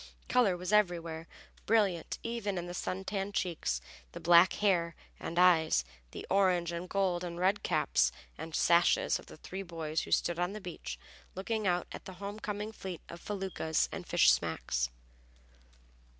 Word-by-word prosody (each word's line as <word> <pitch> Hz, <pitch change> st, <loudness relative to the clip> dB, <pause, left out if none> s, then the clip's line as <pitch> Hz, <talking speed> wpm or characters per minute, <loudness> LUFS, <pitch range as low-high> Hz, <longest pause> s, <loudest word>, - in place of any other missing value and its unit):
Color 210 Hz, -8 st, +3 dB
was 180 Hz, +3 st, -3 dB
everywhere, 170 Hz, -5 st, +1 dB, 0.4 s
brilliant 200 Hz, -6 st, +2 dB
even 230 Hz, -4 st, -2 dB
in 175 Hz, -, -3 dB
the 175 Hz, -, -6 dB
sun 185 Hz, +1 st, -3 dB
tanned 195 Hz, +1 st, -3 dB
cheeks, 155 Hz, -, -1 dB, 0.3 s
the -, -, -6 dB
black 175 Hz, +2 st, +6 dB
hair 175 Hz, -5 st, +1 dB, 0.2 s
and 170 Hz, -, -5 dB
eyes, 160 Hz, -, +5 dB, 0.2 s
the -, -, -8 dB
orange 185 Hz, -3 st, +2 dB
and 170 Hz, +1 st, -5 dB
gold 185 Hz, -3 st, 0 dB
and 170 Hz, -1 st, -5 dB
red 190 Hz, +3 st, +2 dB
caps -, -, +2 dB, 0.2 s
and 160 Hz, +1 st, -6 dB
sashes 170 Hz, 0 st, +3 dB
of -, -, -14 dB
the -, -, -12 dB
three 190 Hz, +4 st, -6 dB
boys 165 Hz, -4 st, -3 dB
who -, -, -8 dB
stood 175 Hz, 0 st, +1 dB
on 180 Hz, +2 st, 0 dB
the 215 Hz, -, -5 dB
beach, 115 Hz, -, -7 dB, 0.4 s
looking 215 Hz, +2 st, -2 dB
out 175 Hz, -1 st, +1 dB
at -, -, -8 dB
the 190 Hz, -, -8 dB
home 200 Hz, +3 st, -6 dB
coming 210 Hz, 0 st, -4 dB
fleet 190 Hz, -5 st, -7 dB
of 170 Hz, -, -9 dB
feluccas 190 Hz, -6 st, -1 dB
and -, -, -6 dB
fishing -, -, +6 dB
smacks. -, -, 0 dB
180 Hz, 165 wpm, -32 LUFS, 170-195 Hz, 0.4 s, black